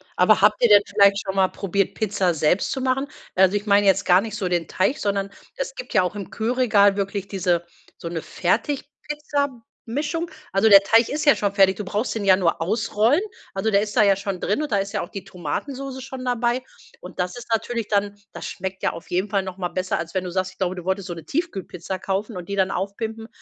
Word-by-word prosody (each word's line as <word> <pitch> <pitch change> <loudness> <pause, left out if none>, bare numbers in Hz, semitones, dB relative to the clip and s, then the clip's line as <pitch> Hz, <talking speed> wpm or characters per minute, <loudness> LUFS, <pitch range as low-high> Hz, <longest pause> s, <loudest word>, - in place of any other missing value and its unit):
Aber 190 +4 +4
habt 210 +1 +4
ihr 240 - +6
denn 205 -1 +8
vielleicht 200 0 +4
schon 190 -1 -4
mal 190 -1 +4
probiert, 195 0 -1
Pizza 195 -4 0
selbst 160 +4 +1
zu 265 - -2
machen? 265 +2 0 0.3
Also, 190 +1 +4
ich 205 +1 -1
meine 205 -1 +4
jetzt 195 0 +3
gar 180 +1 +5
nicht 215 0 -6
so 205 -4 -2
den 175 -2 -1
Teig, 215 +10 0
sondern 200 -1 -1 0.3
es - - -4
gibt - - -8
ja 210 - +5
auch 180 - -3
im 200 -2 -6
Kühlregal 220 -4 +3
wirklich 200 0 -2
diese 175 -3 0 0.3
so 170 - -7
'ne 165 -1 -4
Fertigpizza-Mischung. 285 - -3 0.2
Also, 195 +3 +3
der 200 -1 +9
Teig 225 +3 +4
ist 300 +2 -2
ja 290 - +7
schon 205 -1 -1
fertig. 190 -2 +4
Du 210 - -4
brauchst 210 +5 -2
den 210 -3 -3
ja 190 -1 +7
nur 175 -3 0
ausrollen. 215 - +2 0.3
Also, 195 +3 0
der 200 0 +4
ist 210 -1 -4
da - - +7
ja 200 -1 +5
schon 195 -1 -4
drin 205 - 0
und 300 - -4
da 205 - +3
ist 195 0 -2
ja - - -1
auch - - -6
die 195 - -7
Tomatensoße 260 - -5
schon 265 0 -7
dabei. 245 0 0 0.4
Und 180 +1 -12
das 180 +3 -1
ist 240 - -9
natürlich 225 0 -1
dann 205 -1 0 0.2
das - - -7
schmeckt 190 +1 -6
ja - - +2
auf 165 - -11
jeden 185 +4 -1
Fall 200 - +2
noch 185 -1 -7
mal 180 -2 -2
besser, 185 +1 -2
als 165 0 -5
wenn 185 -1 -1
du 180 - -5
sagst, 185 0 -1
ich 185 - -22
glaube, 185 -1 -1
du 180 - -7
wolltest 190 0 -1
so 175 - -4
'ne 165 -2 -10
Tiefkühlpizza 195 - -4
kaufen 195 +3 -3
und 175 0 -8
die 200 - -2
dann 190 -1 +2
aufpimpen. 220 +3 -4
200 Hz, 235 wpm, -23 LUFS, 185-225 Hz, 0.4 s, der